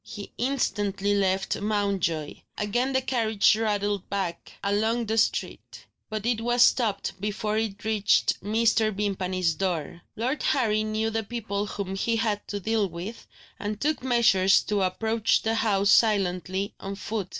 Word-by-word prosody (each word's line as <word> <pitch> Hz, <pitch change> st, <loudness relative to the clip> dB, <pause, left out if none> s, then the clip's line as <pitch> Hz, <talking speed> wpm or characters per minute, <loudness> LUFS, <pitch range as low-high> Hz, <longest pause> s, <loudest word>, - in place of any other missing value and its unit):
He 205 Hz, -2 st, -9 dB
instantly 205 Hz, -6 st, 0 dB
left 195 Hz, -1 st, 0 dB
Mountjoy. 200 Hz, -7 st, -1 dB, 0.2 s
Again 240 Hz, +6 st, 0 dB
the 260 Hz, -1 st, +1 dB
carriage 225 Hz, -5 st, +3 dB
rattled 205 Hz, -3 st, -1 dB
back 190 Hz, -4 st, -4 dB
along 220 Hz, +4 st, +1 dB
the 220 Hz, +1 st, -1 dB
street; -, -, -2 dB, 0.2 s
but 215 Hz, -1 st, -4 dB
it 235 Hz, -2 st, +1 dB
was 240 Hz, +1 st, +4 dB
stopped 220 Hz, -6 st, +2 dB
before 210 Hz, +1 st, -2 dB
it 215 Hz, -2 st, -4 dB
reached 215 Hz, -2 st, +2 dB
Mr. 220 Hz, +1 st, +2 dB
Vimpany's 185 Hz, -4 st, -1 dB
door. 170 Hz, -2 st, -3 dB
Lord 255 Hz, +6 st, -2 dB
Harry 215 Hz, -5 st, +1 dB
knew 215 Hz, +1 st, -1 dB
the 225 Hz, 0 st, -1 dB
people 210 Hz, -2 st, -3 dB
whom 195 Hz, -1 st, -4 dB
he 230 Hz, +4 st, 0 dB
had 220 Hz, -2 st, -1 dB
to 205 Hz, -, -4 dB
deal 215 Hz, -1 st, 0 dB
with, 175 Hz, +7 st, -8 dB, 0.3 s
and 205 Hz, +1 st, -4 dB
took 305 Hz, +2 st, 0 dB
measures 230 Hz, -7 st, +4 dB
to 205 Hz, -2 st, -1 dB
approach 220 Hz, +4 st, +1 dB
the 225 Hz, -, +1 dB
house 200 Hz, -3 st, +2 dB
silently, 195 Hz, -3 st, +2 dB
on 195 Hz, 0 st, -5 dB
foot. 205 Hz, -2 st, -4 dB
210 Hz, 150 wpm, -26 LUFS, 195-225 Hz, 0.3 s, was